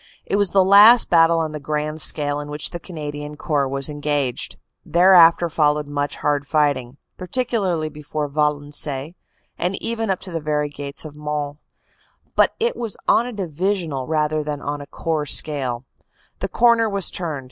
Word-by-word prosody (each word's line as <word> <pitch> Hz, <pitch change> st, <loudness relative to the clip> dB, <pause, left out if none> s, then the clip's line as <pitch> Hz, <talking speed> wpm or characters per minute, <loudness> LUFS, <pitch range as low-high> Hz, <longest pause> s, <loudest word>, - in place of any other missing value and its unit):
It -, -, -1 dB
was 205 Hz, -2 st, +2 dB
the 195 Hz, +1 st, +4 dB
last 210 Hz, +5 st, +7 dB
battle 165 Hz, -1 st, +5 dB
on 160 Hz, -1 st, -1 dB
the 150 Hz, -, -6 dB
grand 150 Hz, +1 st, -3 dB
scale 145 Hz, -1 st, +1 dB
in 145 Hz, -, -6 dB
which 150 Hz, 0 st, -3 dB
the 175 Hz, -, -6 dB
Canadian 150 Hz, -4 st, -7 dB
Corps 145 Hz, -4 st, 0 dB
was 135 Hz, 0 st, +3 dB
engaged. 145 Hz, -4 st, -2 dB, 0.3 s
Thereafter 175 Hz, -1 st, +5 dB
followed 150 Hz, -2 st, +1 dB
much 145 Hz, 0 st, -3 dB
hard 145 Hz, -1 st, -1 dB
fighting, 140 Hz, -5 st, 0 dB, 0.2 s
particularly 185 Hz, -5 st, -1 dB
before 150 Hz, 0 st, -5 dB
Valen 145 Hz, 0 st, -1 dB
ciennes, 145 Hz, +1 st, -4 dB, 0.5 s
and 180 Hz, +2 st, -1 dB
even 225 Hz, -2 st, -3 dB
up 190 Hz, -, 0 dB
to 185 Hz, -, -9 dB
the 165 Hz, -1 st, -3 dB
very 150 Hz, -1 st, -1 dB
gates 145 Hz, +1 st, -8 dB
of 150 Hz, -1 st, -9 dB
Mons, 150 Hz, -1 st, -4 dB, 0.8 s
but -, -, +3 dB
it 470 Hz, +1 st, 0 dB
was 230 Hz, -4 st, -5 dB
on 240 Hz, -, +3 dB
a -, -, -5 dB
Divisional 175 Hz, -, -3 dB
rather 155 Hz, -1 st, 0 dB
than 150 Hz, -1 st, -4 dB
on 145 Hz, 0 st, -4 dB
a 140 Hz, -, -10 dB
Corps 155 Hz, 0 st, -3 dB
scale. 130 Hz, -6 st, 0 dB, 0.5 s
The -, -, -3 dB
corner 235 Hz, -2 st, +3 dB
was 200 Hz, -3 st, +1 dB
turned. 160 Hz, -6 st, -3 dB
150 Hz, 170 wpm, -21 LUFS, 145-180 Hz, 0.8 s, last